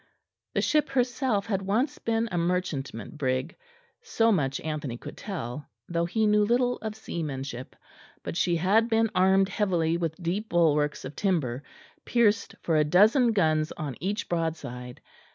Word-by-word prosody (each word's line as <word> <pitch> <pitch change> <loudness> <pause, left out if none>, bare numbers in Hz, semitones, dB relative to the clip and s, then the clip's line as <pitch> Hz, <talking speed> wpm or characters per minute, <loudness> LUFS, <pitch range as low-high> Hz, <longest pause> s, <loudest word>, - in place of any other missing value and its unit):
The - - +2
ship 300 -1 +2
herself 250 -4 0
had 200 -4 -1
once 220 +9 0
been 230 0 0
a 175 - -1
merchantman 170 - -2
brig; 130 +3 -1 0.5
so 230 - +2
much 135 -9 0
Anthony 150 -6 -4
could - - -9
tell, 150 - -6 0.2
though 170 0 0
he 215 +5 0
knew 210 0 +4
little 245 +3 +2
of 220 -1 -5
seamanship; 135 - -5 0.5
but - - -5
she 175 0 +2
had 205 +7 +3
been 225 -1 +2
armed 190 +1 +4
heavily 175 -5 +1
with 165 -2 -2
deep 185 +6 -3
bulwarks 150 -5 +2
of 130 - -7
timber, 145 -11 0 0.4
pierced 225 -3 +2
for 165 -2 +2
a 150 - +5
dozen 215 - +5
guns 155 -6 +1
on 145 -5 -5
each 200 +6 -2
broadside. 150 -8 -4
180 Hz, 155 wpm, -27 LUFS, 150-215 Hz, 0.5 s, a